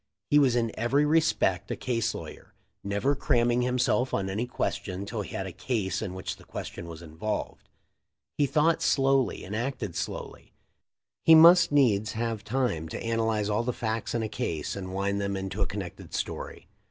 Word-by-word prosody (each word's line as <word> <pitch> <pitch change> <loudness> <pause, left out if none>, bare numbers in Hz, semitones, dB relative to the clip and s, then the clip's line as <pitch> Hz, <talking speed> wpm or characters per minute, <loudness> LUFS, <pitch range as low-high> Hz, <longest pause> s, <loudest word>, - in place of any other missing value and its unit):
He 145 - +7
was 130 -4 +4
in 115 -2 +1
every 135 +6 +2
respect 155 - +2
a - - -1
case 115 -3 -1
lawyer, 80 -2 -10 0.3
never 100 +8 +1
cramming 120 -3 +2
himself 125 0 +1
on 95 -1 -1
any 110 +5 -2
question 95 -5 -3
till 110 +1 -4
he 100 - -7
had 95 - -2
a 95 - -5
case 100 +1 -2
in 95 -4 -4
which 95 - -5
the - - -16
question 85 - -7
was 85 0 -9
involved. 85 +7 -5 0.7
He 145 - +2
thought 160 +3 +2
slowly 135 -1 +2
and 100 - -5
acted 115 -6 -3
slowly; - - -6 0.7
he 165 - +8
must 170 +2 +8
needs 110 -8 +3
have 115 -2 -2
time 105 -10 -1
to - - -5
analyze 110 -2 0
all 105 +1 +1
the 120 +1 -2
facts 110 0 -3
in 115 - 0
a - - -1
case 80 -6 -3
and 95 -2 -6
wind 100 +1 -1
them 100 0 -1
into 95 +2 -4
a 100 - +2
connected 95 -2 -7
story. - - -5
110 Hz, 180 wpm, -28 LUFS, 100-125 Hz, 0.7 s, he